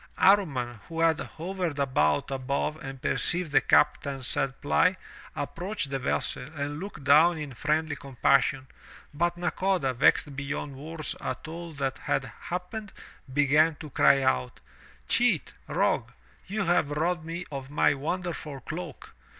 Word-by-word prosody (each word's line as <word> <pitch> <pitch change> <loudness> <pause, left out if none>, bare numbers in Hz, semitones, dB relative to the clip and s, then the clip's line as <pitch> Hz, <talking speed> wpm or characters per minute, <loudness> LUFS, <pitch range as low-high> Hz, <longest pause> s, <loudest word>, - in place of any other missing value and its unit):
Amman, 140 - +3
who 165 0 -5
had 165 -2 +4
hovered 175 -2 -4
about 130 - +1
above 135 +3 -1
and 135 0 -7
perceived 170 +4 -1
the 135 - +5
captain's 135 -2 +2
sad 135 +2 -1
plight, 180 +5 +3 0.4
approached 165 +1 -3
the 135 - -1
vessel 125 - -1
and 145 +1 -3
looked 195 -6 -7
down 155 +5 +6
in 150 -3 -6
friendly 155 +4 0
compassion, 135 0 +2 0.5
but 175 +3 0
Nakoda, 180 -5 0
vexed 135 +2 +3
beyond 140 0 -4
words 155 +1 -5
at 130 +3 -4
all 170 +1 -7
that 135 -2 -2
had 135 - 0 0.2
happened, 185 +4 -5 0.4
began 150 +3 +4
to 150 -1 -10
cry 135 +1 +5
out: 65 - 0 0.5
"Cheat! - - +2
rogue! - - +1 0.4
you 200 +1 -1
have 175 -5 +2
robbed 160 +3 0
me 170 +2 -5
of 135 -1 -6
my 145 - +3
wonderful 160 -1 -4
cloak! 165 0 -7
150 Hz, 140 wpm, -28 LUFS, 135-170 Hz, 0.5 s, down